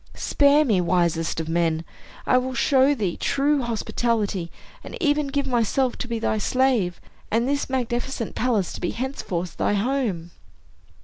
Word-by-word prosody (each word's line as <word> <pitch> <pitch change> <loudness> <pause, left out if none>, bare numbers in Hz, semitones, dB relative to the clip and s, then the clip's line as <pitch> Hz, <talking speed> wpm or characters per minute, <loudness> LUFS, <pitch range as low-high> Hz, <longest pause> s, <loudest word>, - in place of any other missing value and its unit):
Spare 290 +1 +3
me, 205 -8 +2
wisest 170 -2 0
of 160 - -3
men. 165 -1 0 0.4
I 255 - +4
will 260 +1 -4
show 275 +1 +3
thee 200 -8 -2
true 285 +1 +1
hospitality, 220 -5 -1 0.3
and - - -8
even 295 -3 +1
give 280 0 -1
myself 250 +1 +1
to 250 - -3
be 235 -1 -2
thy 220 -1 0
slave, 240 -6 +1 0.3
and 235 +3 +1
this 280 0 -1
magnificent 245 -1 -2
palace 220 -7 0
to - - -8
be 175 - -1
henceforth 185 -10 -4
thy - - +1
home." 205 -6 -1
235 Hz, 150 wpm, -24 LUFS, 180-265 Hz, 0.4 s, I